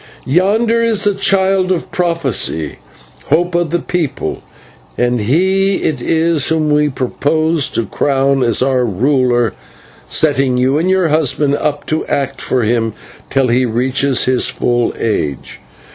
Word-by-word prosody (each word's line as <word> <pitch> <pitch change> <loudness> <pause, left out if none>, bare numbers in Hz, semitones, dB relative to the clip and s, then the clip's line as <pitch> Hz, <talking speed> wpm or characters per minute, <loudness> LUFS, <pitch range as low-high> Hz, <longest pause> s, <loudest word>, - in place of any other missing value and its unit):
"Yonder 215 - +2
is 225 -3 0
the 205 - +2
Child 190 -1 +1
of 180 - -2
Prophecy, 140 - -1 0.5
hope 175 +4 +1
of 175 -1 0
the 175 - 0
people, 175 -4 -3 0.6
and 120 0 +1
he 190 - +1
it 155 - -1
is 160 -2 +1
whom 155 -2 0
we 150 0 +2
purpose 150 +4 -1
to 115 - -2
crown 135 +3 0
as 120 0 +2
our 130 -1 +1
ruler, 120 +1 +1 0.5
setting 135 -4 +2
you 130 +4 +1
and 175 +3 0
your 190 -3 +2
husband 150 -2 +1
up 145 0 -2
to 155 - -1
act 140 -1 -2
for 125 -2 -1
him 115 0 0 0.4
till 135 -2 +1
he 125 +2 +2
reaches 130 +3 0
his 130 -1 +2
full 120 -1 0
age." 75 - -3
145 Hz, 145 wpm, -15 LUFS, 125-170 Hz, 0.6 s, Yonder